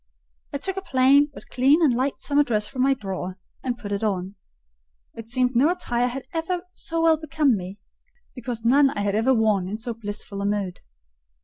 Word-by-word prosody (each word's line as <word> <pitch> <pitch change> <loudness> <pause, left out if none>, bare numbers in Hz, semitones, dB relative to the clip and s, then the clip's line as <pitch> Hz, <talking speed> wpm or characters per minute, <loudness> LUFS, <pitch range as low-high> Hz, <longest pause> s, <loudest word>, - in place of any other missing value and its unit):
I - - -2
took 385 +7 -3
a - - -1
plain 280 -2 +4
but - - -13
clean 270 +5 +4
and 280 -6 +4
light 260 +3 -1
summer 285 0 +2
dress 215 -5 0
from 260 -2 -4
my 270 +1 +3
drawer 190 -5 -5 0.3
and 245 -2 -2
put 210 -4 -8
it 200 +1 -2
on: 190 -2 -1 0.8
it 225 -1 -9
seemed 250 +1 +1
no 270 +7 +5
attire 245 -9 0
had 255 +2 -5
ever 345 +2 -2
so 330 -2 -3
well 325 -1 +5
become 300 -4 +1
me, 190 +1 -7 0.5
because 245 -3 -6
none 275 +4 +5
had 205 -6 -1
I 210 - +2
ever 260 +3 +3
worn 215 -5 +2
in 210 - -3
so 235 +1 -4
blissful 205 -2 -6
a - - -2
mood. 200 -3 -2
245 Hz, 200 wpm, -24 LUFS, 210-280 Hz, 0.8 s, no